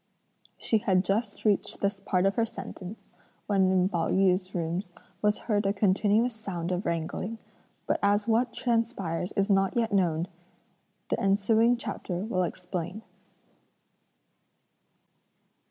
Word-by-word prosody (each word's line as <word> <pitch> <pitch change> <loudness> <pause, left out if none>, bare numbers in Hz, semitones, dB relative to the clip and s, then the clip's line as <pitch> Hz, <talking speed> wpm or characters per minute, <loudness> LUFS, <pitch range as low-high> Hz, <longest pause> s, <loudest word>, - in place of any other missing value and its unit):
She 220 - +1
had 190 -2 +2
just 205 +3 -1
reached 205 -2 +1
this 200 0 0
part 185 -1 +1
of 195 - +3
her 230 - +1
sentence, 220 -3 -8 0.3
when 195 -2 +3
in 185 -1 +3
Pao 170 -4 -1
yü's 185 0 +2
rooms 175 +2 -2 0.3
was 210 0 +2
heard 210 -3 +1
a 195 - +2
continuous 210 +4 +2
sound 185 -6 -4
of 180 +2 -1
wrangling; 170 +6 -2 0.5
but - - 0
as 205 +2 +2
what 230 +2 +2
transpired 225 -8 -1
is 200 +1 +2
not 195 +2 +2
yet 225 -2 +1
known, 170 -3 +2 0.8
the - - +1
ensuing 220 +5 +3
chapter 185 -5 -4
will 185 -5 0
explain. 180 +3 -4
195 Hz, 130 wpm, -28 LUFS, 185-220 Hz, 0.8 s, of